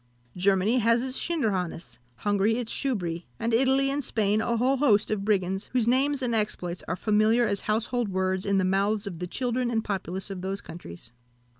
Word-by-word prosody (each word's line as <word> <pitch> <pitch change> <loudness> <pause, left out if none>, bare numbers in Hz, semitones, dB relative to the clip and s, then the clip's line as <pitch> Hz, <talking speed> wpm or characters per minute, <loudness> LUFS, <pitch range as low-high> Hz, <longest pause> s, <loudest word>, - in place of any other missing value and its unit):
Germany 195 +6 +2
has 230 +1 +3
its 260 0 -2
Schinderhannes, 185 - -2 0.2
Hungary 205 - +1
its 240 -2 -3
Schubry, 175 -10 -2
and 230 0 -1
Italy 265 +3 +3
and 285 +1 -1
Spain 215 -3 +1
a 235 +1 0
whole 260 +4 +2
host 215 -8 +3
of 205 -2 -1
brigands, 195 -2 0
whose 245 -3 +2
names 270 +2 +2
and 240 -2 0
exploits 180 -5 -1
are - - -1
familiar 215 +4 +2
as 200 -3 -1
household 230 +1 -1
words 190 0 -1
in 200 -1 +1
the 190 - +2
mouths 200 +3 +1
of 180 -5 -6
the 180 - -4
children 250 +3 -1
and 225 -2 0
populace 190 -1 -4
of 185 -2 -6
those 195 +1 -3
countries. 115 - -11
210 Hz, 185 wpm, -26 LUFS, 190-240 Hz, 0.2 s, has